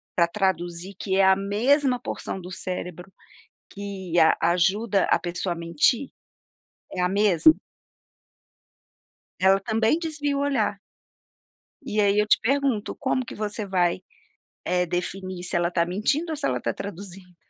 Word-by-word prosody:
pra 170 -1 +4
traduzir, 175 -1 -2
que 190 -2 -1
é 195 - +5
a 190 0 +6
mesma 250 +7 +1
porção 190 - -5
do 180 0 -9
cérebro 180 0 -6 0.6
que 195 -4 -4
a 160 - +5
ajuda 195 +4 +2
a - - +3
pessoa 180 +1 -3
a - - -4
mentir? 170 - +1 0.8
É 185 - -3
a 180 - +2
mesma. 205 - +5 1.9
Ela 190 +1 +4
também 225 +6 +1
desvia 295 -4 -2
o - - 0
olhar. 275 -7 0 1.0
E 210 - -1
aí 200 0 +3
eu 210 - +2
te - - +4
pergunto, 270 -3 0
como 260 -2 -1
que - - -7
você 210 0 -3
vai, 180 -3 +1 0.6
eh, 180 0 +1
definir 185 +1 -4
se 175 - -1
ela 170 0 +1
tá 170 -1 +1
mentindo 275 - 0
ou 315 - -2
se 280 - -2
ela - - -1
tá - - -1
traduzindo?. 190 -2 -9
195 Hz, 150 wpm, -25 LUFS, 180-225 Hz, 1.9 s, a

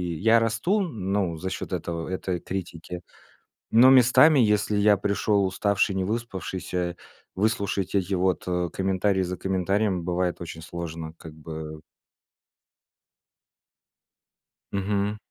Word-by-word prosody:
я 115 +7 +4
расту, 115 - +1
ну, 100 - -2
за 95 +3 -4
счёт - - -5
этого, 85 -1 -3
этой 95 -1 -2
критики, 90 -2 -6 0.7
но 120 +3 +7
местами, 135 +4 +6
если 105 -2 +2
я 105 0 +4
пришёл 100 +1 +1
уставший, 100 +1 +1
не 95 - 0
выспавшийся, 95 -5 -3 0.4
выслушать 100 -2 -1
эти 95 0 0
вот, 90 0 +1
э, 90 -1 0
комментарий 95 0 +1
за 90 0 -4
комментарием 95 0 0
бывает 90 0 -1
очень 80 -1 -7
сложно, 80 -1 -6
как 80 -2 -10
бы. 80 -1 -8 2.9
Мгм. 100 +1 -1
95 Hz, 115 wpm, -25 LUFS, 90-105 Hz, 2.9 s, но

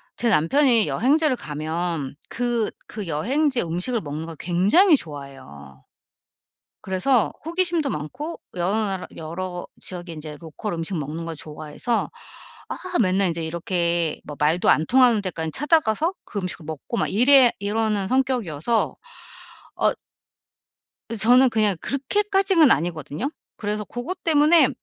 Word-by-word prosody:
제 235 - 0
남편이 230 - +4
여행지를 290 +3 +2
가면 155 - -4
그 240 -2 -1 0.2
그 210 -4 -6
여행지의 250 - 0
음식을 185 +9 -1
먹는 155 +1 -5
걸 165 -2 -9
굉장히 205 - +4
좋아해요. 135 - -9 1.0
그래서 200 +6 +2
호기심도 340 -3 0
많고 275 - -5 0.2
여러 180 +4 0
나라 195 -4 -1
여러 175 +3 -5
지역에 175 -2 -6
인제 155 -1 -8
로컬 170 +4 -6
음식 165 +1 -3
먹는 155 +3 -5
걸 165 -1 -5
좋아해서 155 +10 -3 0.6
아 - - -3 0.3
맨날 190 0 +2
인제 165 0 -3
이렇게 170 -1 -1
뭐 150 - -7
말도 155 +4 +2
안 155 - +3
통하는 245 -5 +4
데까지 160 -4 -3
찾아 315 +3 +3
가서 305 - 0
그 205 - -5
음식을 180 -3 -5
먹고 160 - -5
막 - - +1
이래 250 +3 +6
이러는 205 -1 -1
성격이어서 235 - 0 0.8
어 - - +2 1.2
어 - - -2
저는 250 +4 +5
그냥 215 -4 +2
그렇게까지는 385 +3 +2
아니거든요. 160 - -1 0.3
그래서 210 0 -3
고것 305 - -6
때문에 305 -2 +5
200 Hz, 300 characters per minute, -23 LUFS, 160-255 Hz, 1.2 s, 이래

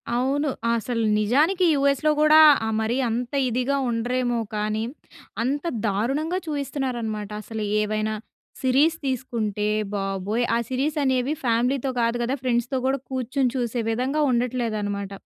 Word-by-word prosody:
అవును. 275 +4 +1 0.2
అసలు 230 0 -1 0.2
నిజానికి 305 - +3
యూఎస్‌లో 280 +2 +2
కూడా 305 0 +6 0.3
ఆహ్, 220 - -1
మరి 225 +3 0
అంత 240 +3 -3 0.2
ఇదిగా 255 +4 0
ఉండరేమో 240 +1 0 0.2
కానీ. 215 +1 -1 0.6
అంత 280 +6 -1 0.2
దారుణంగా 275 - 0
చూయిస్తున్నారనమాట. 250 -8 -3
అసలు 220 0 -5 0.2
ఏవైనా 215 0 -1 0.5
సిరీస్ 280 +6 +3
తీసుకుంటే 225 -5 -2 0.3
బాబోయ్! 195 +4 -1
ఆ - - +3
సిరీస్ 275 +4 -1
అనేవి 260 +1 +1
ఫ్యామిలీతో 245 +3 +1
కాదు 230 +1 +1
కదా 255 +4 0
ఫ్రెండ్స్‌తో 245 +1 0
కూడా 270 0 +1
కూర్చొని 260 0 0
చూసే 240 -1 -1
విధంగా 255 +6 0
ఉండట్లేదు 240 -2 0
అన్నమాట. 200 -1 -3
245 Hz, 125 wpm, -24 LUFS, 225-275 Hz, 0.6 s, కూడా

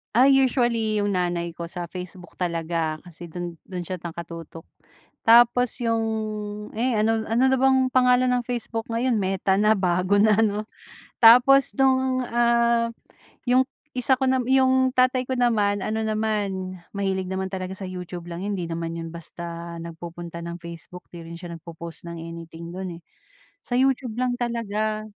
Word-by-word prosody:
Ah, 255 +4 +6
usually 240 -5 +2
'yung 205 - 0
nanay 175 -3 -1
ko 170 - -4
sa 175 0 -6
Facebook 180 -1 -9
talaga 165 -2 -2
kasi 175 -1 -11
dun 175 0 -6
dun 180 -2 -5
siya 180 +2 -5
nakatutok. 165 -1 -8 0.6
Tapos 240 +1 +6
'yung, 230 -1 +1 0.7
eh 245 +2 +1
ano 220 0 +1
ano 230 +3 +1
na 265 - +3
bang 265 0 +3
pangalan 250 0 +4
ng 250 -1 +1
Facebook 230 -2 -3
ngayon, 235 0 +1
Meta 190 -1 +1
na, 215 +1 +4
bago 185 0 +2
na 215 -1 +4
'no. 210 -1 0 0.6
Tapos 250 +4 +7
nung, 260 -1 +3
ah, 235 0 +2 0.6
'yung 255 +1 +5 0.3
isa 255 +1 +2
ko 265 - -1
nam 255 -1 +2
'yung 260 0 +4
tatay 255 0 +3
ko 260 - -1
naman, 210 -5 +2
ano 220 +1 -1
naman, 205 -4 -2 0.2
mahilig 190 -2 -1
naman 190 0 -2
talaga 185 -1 -4
sa 195 - -7
YouTube 180 -1 -7
lang 170 0 -6
'yun, 200 +1 -2
hindi 180 - -3
naman 165 0 -4
'yun 165 -1 -6
basta 170 0 -7
nagpupunta 170 0 -8
ng 170 0 -5
Facebook. 170 +1 -10
Di 175 - -8
rin 165 +1 -8
siya 175 0 -8
nagpo-post 170 +1 -9
ng 170 - -6
anything 165 0 -8
dun 185 -1 -5
eh. - - -45 0.6
Sa 245 - -4
YouTube 260 -3 +1
lang 250 -1 0
talaga. 215 -2 -2
205 Hz, 160 wpm, -24 LUFS, 170-240 Hz, 0.7 s, Tapos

